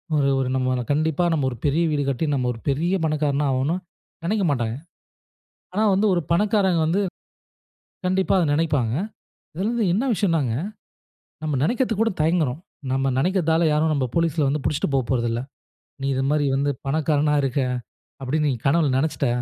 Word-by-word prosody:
1 140 -2 +3
1 130 - 0
நம்ப 130 -1 0
கண்டிப்பா 155 +3 +1
நம்ப 145 -4 0
1 120 - -7
பெரிய 150 +4 +2
வீடு 145 -1 0
கட்டி 140 +4 -1
நம்ப 130 -3 0
ஒரு 115 - -11
பெரிய 165 +7 0
பணக்காரனா 150 -2 0
ஆகனும்னு 135 +6 0 0.5
நினைக்கமாட்டாங்க. 145 - 0 1.0
ஆனா, 205 +4 0
வந்து 200 +3 +2
1 175 - +1
பணக்காரங்க 195 -1 +2
வந்து, 180 +5 +1 1.0
கண்டிப்பா 185 +1 +1
அத 180 - +3
நினைப்பாங்க. 145 -8 +1 0.6
இதுல 190 +6 -1
வந்து 235 -2 0
என்ன 220 +8 +1
விஷயம்னாங்க, 165 - +1 0.9
நம்ப 155 -2 -1
நினைக்கிறதுக்கு 230 - +1
கூட 225 - +2
தயங்குறோம். 155 -3 +1 0.3
நம்ப 135 0 +1
நினைக்குறதால 170 0 +2
யாரும் 155 +1 +2
நம்ப 135 -3 0
போலீஸ்ல 165 -4 +1
வந்து 145 0 -1
பிடிச்சிட்டு 150 0 0
போப்போறதில்ல. 120 -3 0 0.6
நீ 135 - -1
இது 130 - 0
மாரி 150 -1 +2
வந்து 145 +1 +1 0.2
பணக்காரனா 150 0 +1
இருக்க, 135 +1 0 0.6
அப்பிடின்னு 145 +3 0
நீ - - -1
கனவுல 150 0 +3
நினைச்சிட்ட. 150 -1 0
150 Hz, 150 wpm, -23 LUFS, 135-170 Hz, 1.0 s, 1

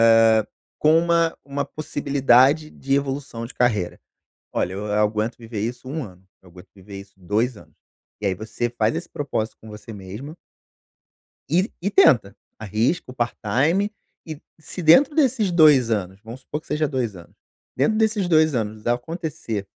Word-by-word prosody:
hã, 110 -1 +5 0.3
com 155 +1 +4
uma 170 -1 +2
uma 140 0 -3
possibilidade 140 0 +2
de 135 -2 -4
evolução 135 -4 -3
de 120 - -10
carreira?" 105 -8 0 0.5
"Olha 90 - -1
eu 100 +2 -5
aguento 105 +2 0
viver 115 -2 -6
isso 120 +4 -4
1 150 +3 -3
ano, 95 -1 -15 0.2
eu 90 - -18
aguento 90 +1 -15
viver 100 +1 -11
isso 100 0 -16
2 105 +6 -1
anos." - - -17 0.5
E 105 - -2
aí 95 - +1
você 110 +4 -4
faz 115 -2 0
esse - - -5
propósito 115 -6 -3
com 110 - -13
você 110 +2 -10
mesma, 105 - -9 1.1
e 185 - +2
e 200 - 0
tenta, 120 - +4 0.2
arrisca 110 - -1
o - - -11
part-time, 130 - 0 0.3
e 155 -2 -8 0.2
se 180 +3 -7
dentro 265 - +6
desses 255 - +2
2 150 -8 +5
anos, 95 -2 -2
vamos 115 +3 -9
supor 150 +3 -5
que - - -25
seja 150 0 0
2 125 -7 -2
anos, 85 -2 -14 0.4
dentro 215 - +1
desses 215 -4 +1
2 155 -4 +3
anos 110 0 -3
acontecer 125 - -3
125 Hz, 165 wpm, -22 LUFS, 105-155 Hz, 1.1 s, dentro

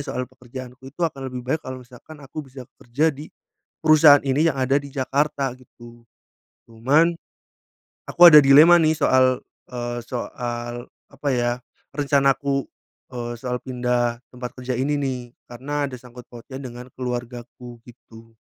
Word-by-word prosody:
soal 130 -2 -4
pekerjaanku 130 0 -11
itu 145 - -17
akan 135 -5 -4
lebih 125 -1 -7
baik 145 +5 -1
kalau 130 -1 -8
misalkan 130 +5 -15
aku 145 +2 -8
bisa 130 -1 -10 0.2
kerja 145 +6 0
di 145 +3 -10 0.6
perusahaan 155 -2 +7
ini 145 +5 +2
yang 140 - -6
ada 135 +1 +1
di 140 - -10
Jakarta, 140 0 -1
gitu. 120 -2 -17 0.7
Cuman 145 +9 +2 1.0
aku - - -8
ada 150 - +11
dilema 150 +6 +7
nih 155 0 +2
soal, 130 -3 +3 0.3
eee, 120 -1 -4
soal 120 -1 -5 0.2
apa 145 - -4
ya 120 -1 +1 0.4
rencanaku, 140 -1 +1 0.5
eee, 120 -1 -5
soal 125 0 -4
pindah 125 -2 -1 0.2
tempat 125 -1 -7
kerja 125 0 -4
ini 145 +3 0
nih, 135 -3 -2 0.3
karena 145 +4 -4
ada 130 - -13
sangkut 125 -1 -13
pautnya 125 +3 -10
dengan 125 -1 -9
keluargaku, 120 -1 -6
gitu. 115 -2 -17
130 Hz, 145 wpm, -22 LUFS, 120-140 Hz, 1.0 s, ada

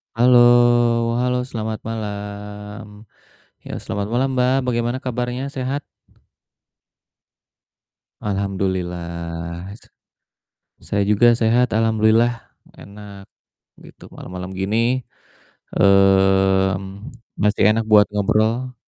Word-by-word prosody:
Halo 125 +2 +5 0.8
halo, 125 0 0
selamat 110 -2 -4
malam. 105 0 -7 0.8
Ya, - - -7
selamat 100 0 -4
malam 130 +2 +1
Mbak, 125 0 +2
bagaimana 120 +1 -1
kabarnya, 125 +1 -3
sehat? 135 +1 -4 2.4
Alhamdulillah. 90 -3 -4
S - - -25 1.0
saya 100 0 -1
juga 105 +3 +4
sehat, 115 +1 +2
alhamdulillah, 110 +1 +2 0.5
enak 100 -1 -12 0.6
gitu, - - -15
malem-malem 90 +1 -8
gini, 100 +3 -1 1.0
eee, 95 -1 +4 0.7
mesti 105 0 +1
enak 115 +1 0
buat 105 -1 +7
ngobrol. 110 +5 0
105 Hz, 85 wpm, -20 LUFS, 95-120 Hz, 2.4 s, buat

